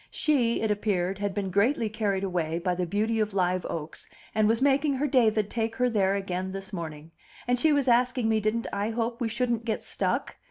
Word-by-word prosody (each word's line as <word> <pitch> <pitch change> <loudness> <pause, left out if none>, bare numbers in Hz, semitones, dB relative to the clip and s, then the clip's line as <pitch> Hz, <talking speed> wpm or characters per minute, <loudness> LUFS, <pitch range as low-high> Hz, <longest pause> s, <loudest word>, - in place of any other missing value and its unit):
She, 250 -7 +1
it 220 - +1
appeared, 195 -3 -1
had 205 -1 -2
been 195 -2 -2
greatly 225 +5 +2
carried 205 -3 -1
away 170 -4 -1
by 180 +1 0
the 180 0 -2
beauty 220 +5 0
of 210 -2 -1
Live 185 -1 +1
Oaks, 160 -1 -6 0.2
and 215 -1 +3
was 225 +1 +2
making 280 +1 +2
her 275 +3 0
David 225 -6 +3
take 225 -1 -2
her 250 -1 +1
there 195 -3 +2
again 185 -1 -3
this 195 +1 -6
morning; 160 -3 -6 0.4
and 245 0 +2
she 315 +4 +4
was 285 -2 +2
asking 245 0 +3
me 220 -1 +2
didn't 215 +2 -1
I 200 +2 -1
hope 230 +1 -2
we 230 - 0
shouldn't 235 0 -1
get 225 -2 -2
stuck? - - -2
215 Hz, 210 wpm, -27 LUFS, 190-235 Hz, 0.4 s, she